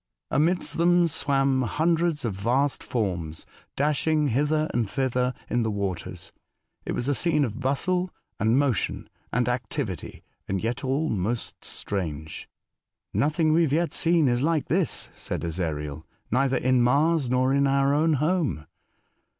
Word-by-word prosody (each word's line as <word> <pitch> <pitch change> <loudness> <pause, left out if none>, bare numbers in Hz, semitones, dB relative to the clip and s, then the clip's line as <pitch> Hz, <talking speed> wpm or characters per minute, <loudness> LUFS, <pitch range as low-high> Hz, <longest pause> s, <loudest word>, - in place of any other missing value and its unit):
Amidst 170 +3 +1
them 175 0 +4
swam 135 -4 +1
hundreds 160 +4 +1
of 110 - -1
vast 125 +8 0
forms, 85 -9 -1 0.3
dashing 150 +1 +1
hither 150 +5 +1
and 115 -4 0
thither 125 -1 0 0.2
in 120 - 0
the 110 - 0
waters. 100 -5 -4 0.6
It - - -1
was 120 - -2
a 145 - +3
scene 150 -1 +2
of 110 - -6
bustle, 180 +8 0 0.3
and 110 +4 +3
motion, 140 -6 0 0.2
and 125 0 +1
activity, 120 - -3 0.3
yet 115 +8 -2
all 140 +4 0
most 110 +3 -3
strange. 80 -6 -4 0.3
" - - -65 0.3
Nothing 150 - +2
we 165 - +4
have 150 -4 +1
yet 170 +2 +1
seen 165 -3 +3
is 120 0 +1
like 155 0 0
this," - - 0
said - - -4
Ezariel. 80 -3 -3 0.3
"Neither 135 +2 +2
in 130 0 +2
Mars 145 +3 +3
nor 130 +1 +2
in 140 0 +3
our 140 0 +3
own 155 +2 +3
home." 150 - 0
135 Hz, 145 wpm, -26 LUFS, 115-155 Hz, 0.6 s, them